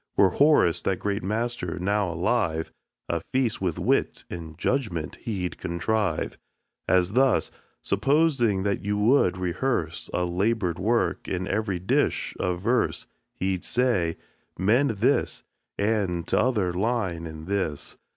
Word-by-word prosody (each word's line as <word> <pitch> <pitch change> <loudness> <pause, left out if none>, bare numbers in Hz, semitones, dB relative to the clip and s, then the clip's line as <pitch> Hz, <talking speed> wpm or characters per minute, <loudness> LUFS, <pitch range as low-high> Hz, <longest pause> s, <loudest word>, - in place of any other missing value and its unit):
Were 95 -2 +5
Horace, 145 - +4
that 95 - 0
great 100 +2 -2
master, 110 -3 -2
now 100 +1 0
alive, 85 -3 0 0.4
A 85 -1 -1
feast 125 -6 0
with 90 -4 -1
wit - - 0
and 80 -2 -7
judgment 95 - -1
he'd 95 -6 -4
contrive, 95 0 -1 0.5
As 90 0 +3
thus: 130 +1 +3 0.3
Supposing 120 -3 +2
that 100 -1 -1
you 105 +1 -1
would 105 -4 +3
rehearse 90 -2 -2
A 90 - 0
labor'd 90 0 0
work, 115 +5 0
and 95 0 -2
every 105 -3 -1
dish 90 +2 0
a 90 -1 0
verse, 115 +8 0 0.3
He'd 95 -1 -1
say, 110 -10 +1 0.4
"Mend 115 +10 +3
this 135 +4 +1 0.3
and 100 -5 0
t'other 105 -9 +1
line 95 -5 -1
and 80 0 -9
this." 95 -6 -3
95 Hz, 130 wpm, -26 LUFS, 90-115 Hz, 0.5 s, Were